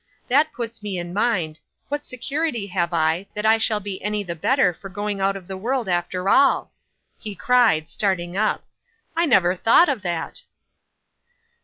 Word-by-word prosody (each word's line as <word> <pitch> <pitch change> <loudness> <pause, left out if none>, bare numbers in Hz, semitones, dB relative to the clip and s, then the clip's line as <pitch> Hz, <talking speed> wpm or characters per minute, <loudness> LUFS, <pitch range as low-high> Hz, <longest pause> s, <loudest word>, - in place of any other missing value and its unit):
That 295 +5 +3
puts 230 -4 -5
me 205 -3 -4
in 175 0 -5
mind 185 -8 0 0.3
what 290 +1 -3
security 260 -2 -2
have 175 -3 -1
I, 165 +3 +1
that 210 +1 -2
I 220 +1 +5
shall 220 -1 +1
be 200 -2 -5
any 210 0 -1
the 175 -3 -4
better 180 - +2
for 195 +4 -10
going 205 +1 -3
out 195 +1 +1
of 190 -2 -8
the 190 - -5
world 240 +5 -2
after 180 +1 -1
all!" 275 +7 +4 0.5
he 210 -3 -6
cried, 240 - +3
starting 185 -3 -2
up; 215 +2 0 0.5
"I 335 +1 +2
never 180 - +4
thought 230 - +5
of 260 -7 -1
that." 175 -4 -4
205 Hz, 170 wpm, -22 LUFS, 180-240 Hz, 0.5 s, I